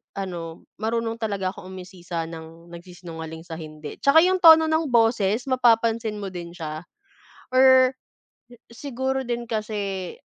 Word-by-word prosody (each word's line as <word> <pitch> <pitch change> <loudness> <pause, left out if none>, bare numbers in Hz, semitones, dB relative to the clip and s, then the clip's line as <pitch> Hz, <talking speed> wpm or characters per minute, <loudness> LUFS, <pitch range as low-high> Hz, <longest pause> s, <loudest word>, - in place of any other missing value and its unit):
ano 170 -4 -6 0.2
marunong 230 +1 -2
talaga 200 -4 -2
akong 190 0 -11
umusisa 180 -2 -6
ng 165 +1 -11
nagsisinungaling 170 -2 -9
sa 165 -2 -8
hindi, 155 -1 -9
tsaka 280 +3 +5
'yung 370 +1 +3
tono 320 -2 +8
ng 315 +1 +1
boses 225 -1 +2
mapapansin 225 -3 +2
mo 195 - -4
din 170 -1 -8
siya 155 0 -6 0.6
or 260 0 +5 0.5
si 240 0 -16 0.4
siguro 265 +1 -1
din 240 0 -2
kasi, 205 -4 -4
200 Hz, 135 wpm, -24 LUFS, 170-240 Hz, 0.6 s, tono